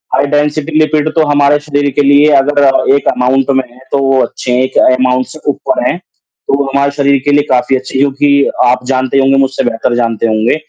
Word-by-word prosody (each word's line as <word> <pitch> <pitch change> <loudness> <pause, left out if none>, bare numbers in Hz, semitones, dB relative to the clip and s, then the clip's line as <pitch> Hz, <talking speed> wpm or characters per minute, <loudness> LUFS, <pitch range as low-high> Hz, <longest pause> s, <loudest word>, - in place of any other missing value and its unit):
high - - +1
density 150 +1 -1
lipid, 155 0 +1
तो 160 -1 +2
हमारे 145 0 +2
शरीर 145 -1 -2
के 140 - 0
लिए 145 +1 +4
अगर 140 -2 +1
एक 140 - -2
अमाउंट 130 +2 0
में 135 -1 0
हैं, 125 - -20
तो - - +1
वो 135 -1 +2
अच्छे 125 - -6
हैं, 125 +1 +1
एक 130 0 -3 0.2
अमाउंट 130 0 0
से 155 - -12
ऊपर 310 - -2
हैं, - - -2 0.5
तो - - -1
वो 140 - 0
हमारे 140 +1 -1
शरीर 140 -1 +1
के 145 - +1
लिए 145 0 +3
काफ़ी 130 +1 +1
अच्छे 130 0 -6
हैं, - - +1
क्योंकि 140 0 +1 0.2
आप 125 +1 0
जानते 130 0 -1
ही - - +4
होंगे, 135 0 +2
मुझसे 135 0 -1
बेहतर 115 +1 -2
जानते 115 -1 -1
होंगे 110 +3 0
140 Hz, 225 wpm, -11 LUFS, 130-145 Hz, 0.5 s, लिए